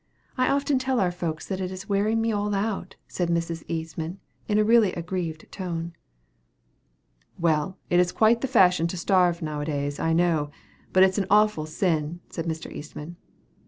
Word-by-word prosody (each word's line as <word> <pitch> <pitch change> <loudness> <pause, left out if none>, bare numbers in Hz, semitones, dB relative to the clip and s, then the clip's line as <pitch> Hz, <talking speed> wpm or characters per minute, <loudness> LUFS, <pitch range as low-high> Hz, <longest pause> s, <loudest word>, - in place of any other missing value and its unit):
I 255 -1 +2
often 280 -1 +2
tell 260 -1 0
our 185 -3 +2
folks 165 -3 -4
that 190 -1 -3
it 185 - -2
is 185 +2 -8
wearing 210 +2 +1
me 225 0 +1
all 205 -1 -1
out," 195 -2 -2
said 175 -2 -2
Mrs. 165 -1 -1
Eastman, 165 +2 -4 0.3
in 210 - +2
a 215 - +5
really 220 -3 +5
aggrieved 170 -2 -4
tone. 170 -3 -4 1.4
"Well, 165 +2 +1
it 175 - +5
is 180 0 +3
quite 225 +1 +3
the 270 - 0
fashion 180 -9 +4
to 180 - -5
starve, 175 -1 +2
now 150 -1 -3
a - - -3
days, 145 -1 -2
I 165 - +1
know; 165 -3 +2 0.4
but 185 - +6
it 190 - +6
is 190 - -2
an 195 - -1
awful 210 -6 +3
sin," 160 0 -1
said 165 - -4
Mr. 160 0 -4
Eastman. 155 +3 -8
180 Hz, 185 wpm, -25 LUFS, 165-205 Hz, 1.4 s, but